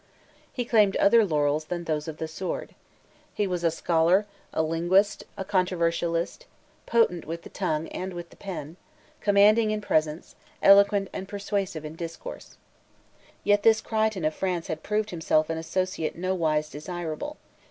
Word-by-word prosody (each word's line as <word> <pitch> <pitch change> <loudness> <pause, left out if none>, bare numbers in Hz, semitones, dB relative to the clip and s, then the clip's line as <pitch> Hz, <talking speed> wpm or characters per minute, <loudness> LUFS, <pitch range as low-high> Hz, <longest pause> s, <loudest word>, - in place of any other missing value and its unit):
He 245 - -3
claimed 210 -4 +4
other 225 +3 +5
laurels 150 -4 +1
than 175 +1 -4
those 155 -2 -2
of 155 -1 -6
the 160 - -3
sword. 175 +4 -5 0.6
He 210 - +1
was 180 -2 -2
a 165 - +4
scholar, 170 +4 +2 0.3
a 160 - 0
linguist, 175 +6 +2
a 195 - -4
controversialist, 175 - 0 0.4
potent 225 -8 +2
with 165 +2 -6
the - - -11
tongue 160 -5 -1
and 185 0 -5
with 170 -1 -7
the - - -15
pen, 175 -4 -7 0.4
commanding 210 +2 +5
in 215 0 0
presence, 155 -5 -1 0.3
eloquent 200 0 +6
and 190 - -5
persuasive 195 -5 -3
in 155 +1 -7
discourse. 170 - -8 0.9
Yet 205 0 +3
this 220 +1 +5
Crichton 220 -5 -1
of 155 - +1
France 180 -2 -2
had 160 0 -3
proved 215 0 -1
himself 160 -2 +1
an 160 - -2
associate 185 0 -2
nowise 165 -4 0
desirable. 175 - -5
180 Hz, 150 wpm, -26 LUFS, 160-205 Hz, 0.9 s, eloquent